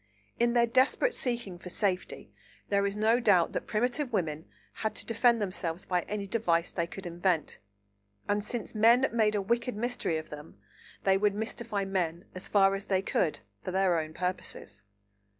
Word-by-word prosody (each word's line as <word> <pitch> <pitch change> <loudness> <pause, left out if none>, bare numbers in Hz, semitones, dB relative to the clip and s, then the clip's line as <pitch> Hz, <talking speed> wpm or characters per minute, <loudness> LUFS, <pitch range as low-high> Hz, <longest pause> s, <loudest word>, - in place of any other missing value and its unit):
In 235 0 +3
their 240 -1 +5
desperate 260 - +2
seeking 235 - -1
for 180 - -9
safety 190 -1 -2 0.4
there 200 0 +2
is 200 - -3
no 220 +3 +3
doubt 195 -8 +4
that - - -4
primitive 245 +5 0
women 160 -7 -1 0.4
had 220 - -1
to - - -2
defend 235 +1 +3
themselves 185 -4 -3
by 180 -1 +1
any 205 -1 -3
device 180 -5 0
they 170 -2 -1
could 195 +2 -9
invent; 175 -2 -1 0.7
and 205 0 +1
since 230 +1 -4
men 235 +4 +5
made 215 -2 +2
a 200 - 0
wicked 235 +3 0
mystery 240 -7 -1
of 155 - -7
them, 150 +1 -10 0.5
they 195 0 +4
would 205 0 +2
mystify 220 -1 -3
men 175 -3 -2
as 185 - -5
far 195 -1 +4
as 195 +1 -4
they 190 -1 +1
could, 155 - 0 0.2
for - - -4
their 185 -2 +2
own 155 0 -6
purposes. 180 - -4
200 Hz, 175 wpm, -29 LUFS, 180-230 Hz, 0.7 s, their